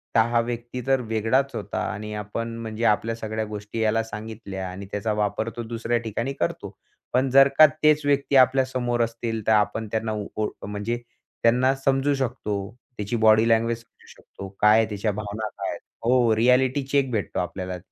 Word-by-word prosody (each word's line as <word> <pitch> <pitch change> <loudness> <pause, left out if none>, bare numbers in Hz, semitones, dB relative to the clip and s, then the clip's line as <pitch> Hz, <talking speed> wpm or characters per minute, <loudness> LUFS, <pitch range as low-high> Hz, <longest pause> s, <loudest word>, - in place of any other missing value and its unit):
तर - - +6
हा 120 0 +2
व्यक्ती 120 +1 -5
तर 135 -1 +3
वेगळाच 115 +4 0
होता - - -4
आणि 105 0 -6
आपण 115 +3 -4
म्हणजे 110 +1 -5
आपल्या 115 +2 +2
सगळ्या 110 -1 -3
गोष्टी 105 +1 -6
याला 110 +1 +2
सांगितल्या 105 -4 -7
आणि 95 +2 -8
त्याचा 105 +1 -1
वापर 105 +1 -1
तो 120 - -3
दुसऱ्या 115 +1 -1
ठिकाणी 115 +4 -3
करतो. - - -4 0.4
पण 130 +1 +2
जर 135 +1 +7
का 155 - +10 0.2
तेच 150 0 +5
व्यक्ती 140 0 +1
आपल्या 130 0 +5
समोर 120 -2 -1
असतील, 115 -1 -3
तर - - +4
आपण 105 +1 +1
त्यांना 110 -1 -1 0.2
ओळ 110 -1 -1 0.2
म्हणजे 105 +3 -3 0.5
त्यांना 125 +3 +4
समजू 135 +1 +2
शकतो. 105 -6 -3 0.2
त्याची 105 +3 -3
बॉडी 110 +1 +6
लँग्वेज 115 +1 +2
समजू 115 - -23
शकतो. 100 - -10
काय 105 +1 +6
आहे, 110 0 +1
त्याच्या 105 +1 -1
भावना 105 +1 -4
काय - - -5
आहेत. - - -5 0.3
हो, 120 -2 +4
रिॲलिटी 125 +4 +3
चेक 135 -2 +1
भेटतो 105 -4 -2
आपल्याला. 90 +1 -4
115 Hz, 175 wpm, -24 LUFS, 105-125 Hz, 0.5 s, का